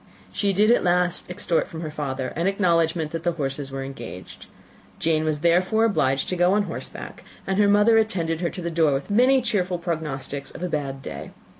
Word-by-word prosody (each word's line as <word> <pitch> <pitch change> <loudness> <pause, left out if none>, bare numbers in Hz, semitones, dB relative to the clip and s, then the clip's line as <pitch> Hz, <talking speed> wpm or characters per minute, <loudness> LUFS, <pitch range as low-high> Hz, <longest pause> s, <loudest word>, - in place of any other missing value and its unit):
She 200 -1 +1
did 210 +4 +4
at 240 - +3
last 175 0 +1
extort 180 -1 0
from 160 - -8
her 155 -2 -5
father 135 -4 -3
an 170 +7 -2
acknowledgment 165 -5 +1
that 165 - -4
the 175 0 0
horses 140 -2 -4
were 135 0 -5
engaged; 115 -10 -9 0.5
Jane 155 -1 +1
was 155 -1 -1
therefore 185 +6 +3
obliged 135 -11 +1
to 185 - -1
go 175 +1 +3
on 205 0 +3
horseback, - - -8 0.2
and 190 +1 -1
her 205 - +5
mother 210 +2 +5
attended 170 -7 -1
her 170 - 0
to 180 - -7
the 170 - -2
door 160 -3 +3
with 135 +8 -3
many 255 +4 +4
cheerful 185 -6 0
prognostics 145 -5 -4
of - - -9
a 180 - -1
bad 135 -3 -3
day. 70 -8 -7
170 Hz, 200 wpm, -24 LUFS, 150-190 Hz, 0.5 s, her